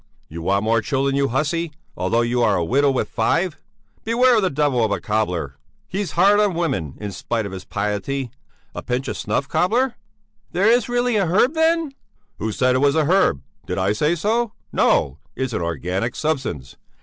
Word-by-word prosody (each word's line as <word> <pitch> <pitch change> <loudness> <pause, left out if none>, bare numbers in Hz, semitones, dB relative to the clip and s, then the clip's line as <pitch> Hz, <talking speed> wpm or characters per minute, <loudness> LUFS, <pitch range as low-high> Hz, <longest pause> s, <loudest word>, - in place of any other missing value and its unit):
You 85 +2 -7
want 100 +4 +1
more 115 +1 +2
children, 135 +2 0
you 140 0 +2
hussy, 155 +6 -1 0.2
although 115 - +1
you 120 +1 0
are - - +3
a 85 - 0
widow 140 +8 +3
with 130 - 0
five! 170 -1 0 0.4
Beware 240 +2 +4
of - - +3
that 185 -8 -1
devil 140 -5 +2
of 110 - +1
a - - 0
cobbler! 90 -10 -2 0.3
He's 195 0 -3
hard 200 +4 +5
on 205 -4 +2
women, 120 - -2
in 105 -1 -5
spite 110 +4 -3
of 100 - -6
his 95 -1 -8
piety. 105 +6 -3 0.4
A - - -5
pinch 125 +2 -2
of - - -3
snuff, 135 - -2
cobbler?" 225 - +1 0.6
"There 180 +3 +1
is 240 +2 +3
really 245 -1 +1
a 195 -4 +1
herb 210 - +3
then...." 325 -1 +2 0.5
"Who 110 +1 -2
said 125 +4 +2
it 130 - +2
was 140 +1 +3
a 160 -2 +2
herb? 150 - +2 0.2
Did 90 - -3
I 95 +2 +1
say 150 +10 +1
so? 220 +6 0 0.2
No; 70 +1 +2 0.2
it's 130 -2 -3
an 95 - -1
organic 90 - -2
substance. 130 - -3
135 Hz, 195 wpm, -21 LUFS, -, 0.6 s, hard